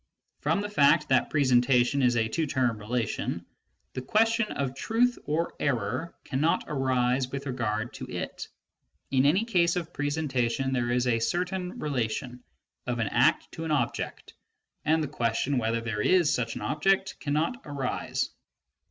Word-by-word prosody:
From 200 Hz, -, +1 dB
the 205 Hz, -, -3 dB
fact 145 Hz, -9 st, +4 dB
that 130 Hz, -, +3 dB
presentation 130 Hz, -1 st, +3 dB
is 125 Hz, -2 st, +3 dB
a 110 Hz, -1 st, +2 dB
two 160 Hz, +7 st, -1 dB
term 125 Hz, -5 st, 0 dB
relation, 115 Hz, +2 st, -2 dB, 0.5 s
the 130 Hz, -, -4 dB
question 225 Hz, -, +2 dB
of 135 Hz, -2 st, -2 dB
truth 235 Hz, -, +1 dB
or 160 Hz, +3 st, -1 dB
error 125 Hz, +3 st, -1 dB
cannot 150 Hz, +4 st, +1 dB
arise 130 Hz, -2 st, +1 dB
with 140 Hz, 0 st, -5 dB
regard 115 Hz, -3 st, -2 dB
to -, -, -7 dB
it: -, -, -5 dB, 0.6 s
in 135 Hz, +1 st, +4 dB
any 185 Hz, +10 st, +3 dB
case 175 Hz, -6 st, +2 dB
of 175 Hz, -1 st, -4 dB
presentation 135 Hz, -3 st, -1 dB
there 120 Hz, -2 st, 0 dB
is 125 Hz, +1 st, +1 dB
a 120 Hz, -2 st, +2 dB
certain 180 Hz, +8 st, -2 dB
relation 125 Hz, -2 st, -3 dB, 0.4 s
of 125 Hz, -1 st, -1 dB
an 115 Hz, -3 st, 0 dB
act -, -, +2 dB
to 165 Hz, -, -6 dB
an 160 Hz, -, -3 dB
object, 135 Hz, -6 st, -2 dB, 0.5 s
and 160 Hz, +1 st, +3 dB
the -, -, -2 dB
question 120 Hz, +3 st, 0 dB
whether 115 Hz, 0 st, 0 dB
there 115 Hz, -2 st, -2 dB
is 175 Hz, +3 st, +4 dB
such 115 Hz, -2 st, -1 dB
an -, -, -6 dB
object 195 Hz, +5 st, +1 dB
cannot 155 Hz, -, -1 dB
arise. 140 Hz, -3 st, -2 dB
135 Hz, 155 wpm, -28 LUFS, 120-160 Hz, 0.6 s, fact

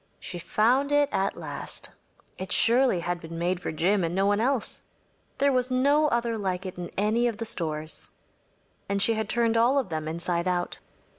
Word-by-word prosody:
She 175 Hz, -, -6 dB
found 240 Hz, -, +2 dB
it 290 Hz, -1 st, +3 dB
at 195 Hz, -, -1 dB
last. -, -, -6 dB, 0.5 s
It 185 Hz, 0 st, -6 dB
surely 240 Hz, -5 st, +4 dB
had 175 Hz, 0 st, -2 dB
been 165 Hz, 0 st, -8 dB
made 175 Hz, +1 st, 0 dB
for -, -, -3 dB
Jim 180 Hz, +5 st, +1 dB
and 165 Hz, +1 st, -2 dB
no 195 Hz, +1 st, +2 dB
one 205 Hz, +1 st, +2 dB
else. 250 Hz, 0 st, 0 dB, 0.6 s
There 280 Hz, 0 st, +3 dB
was 255 Hz, -1 st, +1 dB
no 285 Hz, +4 st, +3 dB
other 235 Hz, -4 st, 0 dB
like 190 Hz, -1 st, -2 dB
it 185 Hz, -, -6 dB
in 175 Hz, -, -5 dB
any 220 Hz, +4 st, +2 dB
of 230 Hz, -3 st, -3 dB
the 230 Hz, -, -4 dB
stores, 155 Hz, -6 st, -2 dB, 0.8 s
and 200 Hz, 0 st, 0 dB
she 225 Hz, +3 st, +4 dB
had 220 Hz, -1 st, -3 dB
turned 230 Hz, -1 st, +2 dB
all 240 Hz, +5 st, +4 dB
of 260 Hz, -8 st, 0 dB
them 155 Hz, -1 st, -3 dB
inside 170 Hz, +2 st, -2 dB
out. 175 Hz, -1 st, -1 dB
205 Hz, 195 wpm, -26 LUFS, 175-240 Hz, 0.8 s, surely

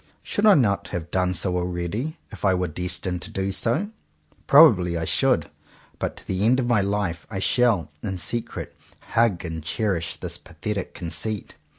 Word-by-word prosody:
Should 210 Hz, +1 st, +1 dB
I 205 Hz, -, +8 dB
not 100 Hz, -6 st, +2 dB
have 85 Hz, -3 st, -5 dB
done 90 Hz, -1 st, +1 dB
so 90 Hz, +1 st, +1 dB
already, 90 Hz, -, -2 dB
if -, -, -11 dB
I 95 Hz, -2 st, +4 dB
were 90 Hz, 0 st, 0 dB
destined 90 Hz, +2 st, -3 dB
to -, -, -7 dB
do 95 Hz, 0 st, -2 dB
so? 120 Hz, -, 0 dB, 0.6 s
Probably 100 Hz, -, +6 dB
I 80 Hz, -, -2 dB
should; -, -, +1 dB, 0.5 s
but -, -, -3 dB
to -, -, -11 dB
the 95 Hz, +1 st, -1 dB
end 125 Hz, +4 st, +4 dB
of 130 Hz, -, 0 dB
my 120 Hz, -4 st, +3 dB
life 100 Hz, -4 st, -2 dB
I 105 Hz, -, -5 dB
shall, 110 Hz, -2 st, +2 dB
in 95 Hz, -2 st, -3 dB
secret, 115 Hz, +7 st, -3 dB, 0.3 s
hug 110 Hz, -7 st, +2 dB
and 80 Hz, -2 st, -5 dB
cherish 85 Hz, -1 st, -1 dB
this -, -, -4 dB
pathetic 105 Hz, -3 st, -5 dB
conceit. 95 Hz, +5 st, -3 dB
95 Hz, 175 wpm, -24 LUFS, 90-115 Hz, 0.6 s, I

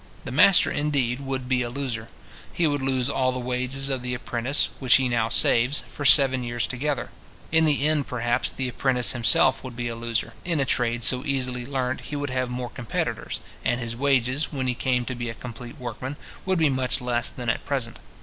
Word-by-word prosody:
The -, -, -5 dB
master, 165 Hz, +8 st, +6 dB
indeed, 140 Hz, -4 st, 0 dB
would 135 Hz, -2 st, -4 dB
be 130 Hz, -1 st, +1 dB
a 120 Hz, -, -2 dB
loser. 120 Hz, -4 st, -4 dB, 0.4 s
He 175 Hz, -, 0 dB
would 145 Hz, -2 st, 0 dB
lose 130 Hz, -2 st, 0 dB
all 130 Hz, -2 st, +1 dB
the 130 Hz, -, -4 dB
wages 130 Hz, +2 st, -2 dB
of 130 Hz, -2 st, -1 dB
the 125 Hz, 0 st, -3 dB
apprentice, 120 Hz, +3 st, 0 dB
which 130 Hz, -3 st, +5 dB
he 130 Hz, -1 st, +3 dB
now 115 Hz, -2 st, 0 dB
saves, 125 Hz, +4 st, +4 dB
for 145 Hz, -, -8 dB
seven 130 Hz, -2 st, +6 dB
years 120 Hz, 0 st, -1 dB
together. 140 Hz, +2 st, -3 dB, 0.4 s
In 160 Hz, 0 st, +4 dB
the 145 Hz, -2 st, +2 dB
end, 155 Hz, -3 st, +1 dB
perhaps, 120 Hz, 0 st, 0 dB
the 130 Hz, -, -3 dB
apprentice 125 Hz, -2 st, +1 dB
himself 120 Hz, +1 st, +3 dB
would 130 Hz, -2 st, -8 dB
be 120 Hz, 0 st, -3 dB
a 115 Hz, -, -4 dB
loser. 115 Hz, 0 st, -2 dB
In 170 Hz, -3 st, -1 dB
a 140 Hz, -, +1 dB
trade 120 Hz, -1 st, 0 dB
so 125 Hz, +3 st, +4 dB
easily 125 Hz, -3 st, -2 dB
learnt 130 Hz, -2 st, -2 dB
he 150 Hz, -, -4 dB
would 145 Hz, -2 st, -3 dB
have 130 Hz, -1 st, -1 dB
more 125 Hz, 0 st, -5 dB
competitors, 120 Hz, -5 st, -3 dB, 0.2 s
and 120 Hz, -, 0 dB
his 115 Hz, -1 st, -4 dB
wages, 135 Hz, +1 st, +1 dB
when 135 Hz, -3 st, -3 dB
he 125 Hz, -, +1 dB
came 125 Hz, 0 st, 0 dB
to 130 Hz, -, -4 dB
be 120 Hz, -1 st, -4 dB
a 115 Hz, -, -6 dB
complete 120 Hz, +3 st, -9 dB
workman, 130 Hz, +2 st, -6 dB, 0.3 s
would 190 Hz, -1 st, +2 dB
be 160 Hz, -2 st, +4 dB
much 130 Hz, -1 st, 0 dB
less 120 Hz, -2 st, 0 dB
than 125 Hz, -2 st, -8 dB
at 115 Hz, -, 0 dB
present. 130 Hz, -5 st, -2 dB
125 Hz, 210 wpm, -25 LUFS, 120-135 Hz, 0.4 s, master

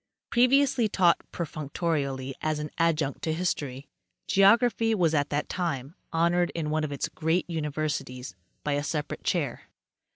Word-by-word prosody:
Previously 250 Hz, -1 st, +4 dB
taught 180 Hz, -4 st, +4 dB
perfunctorily 145 Hz, -4 st, -2 dB
as 155 Hz, -1 st, 0 dB
an 150 Hz, 0 st, -5 dB
adjunct 160 Hz, -4 st, +1 dB
to 160 Hz, -, -1 dB
history, 145 Hz, -6 st, -2 dB, 0.4 s
geography 225 Hz, +3 st, +4 dB
was 170 Hz, -5 st, +2 dB
at 145 Hz, -2 st, +1 dB
that 145 Hz, 0 st, -1 dB
time 155 Hz, -6 st, -3 dB, 0.2 s
honored 170 Hz, +2 st, +2 dB
in 155 Hz, -2 st, -2 dB
one 155 Hz, 0 st, +1 dB
of 150 Hz, -, -2 dB
its 140 Hz, -, -2 dB
great 160 Hz, +3 st, 0 dB
universities 150 Hz, -5 st, -3 dB, 0.3 s
by 150 Hz, -, -1 dB
a 145 Hz, 0 st, +1 dB
separate 150 Hz, 0 st, -3 dB
chair. -, -, -1 dB
155 Hz, 140 wpm, -27 LUFS, 145-175 Hz, 0.4 s, Previously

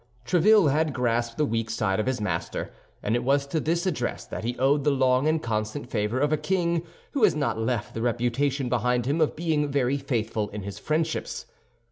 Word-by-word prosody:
Tréville 185 Hz, -1 st, +5 dB
had 155 Hz, 0 st, +1 dB
grasped 120 Hz, -1 st, 0 dB
the 150 Hz, -, +2 dB
weak 115 Hz, -3 st, -1 dB
side 105 Hz, -4 st, 0 dB
of 110 Hz, -, -1 dB
his 130 Hz, -2 st, 0 dB
master; 105 Hz, -, -3 dB, 0.3 s
and 110 Hz, -, +1 dB
it 120 Hz, -, 0 dB
was 140 Hz, +2 st, +2 dB
to 150 Hz, +3 st, -1 dB
this 170 Hz, +4 st, 0 dB
address 150 Hz, -10 st, -2 dB
that -, -, -6 dB
he 120 Hz, +2 st, -2 dB
owed 140 Hz, +2 st, +2 dB
the 150 Hz, -, +3 dB
long 130 Hz, 0 st, +3 dB
and 155 Hz, 0 st, +1 dB
constant 110 Hz, +4 st, -2 dB
favor 105 Hz, +2 st, 0 dB
of 145 Hz, +2 st, +2 dB
a -, -, +3 dB
king 170 Hz, -1 st, 0 dB, 0.3 s
who 275 Hz, -6 st, -1 dB
has 200 Hz, -7 st, +5 dB
not 140 Hz, -6 st, -1 dB
left 115 Hz, 0 st, -2 dB
the 115 Hz, -, -4 dB
reputation 125 Hz, +3 st, 0 dB
behind 125 Hz, 0 st, +1 dB
him 145 Hz, +5 st, 0 dB
of 155 Hz, -, +2 dB
being 155 Hz, -3 st, 0 dB
very 140 Hz, -1 st, +1 dB
faithful 110 Hz, -5 st, -2 dB
in 105 Hz, -1 st, -6 dB
his 100 Hz, +1 st, -7 dB
friendships. 160 Hz, +4 st, -2 dB
130 Hz, 205 wpm, -26 LUFS, 115-155 Hz, 0.3 s, Tréville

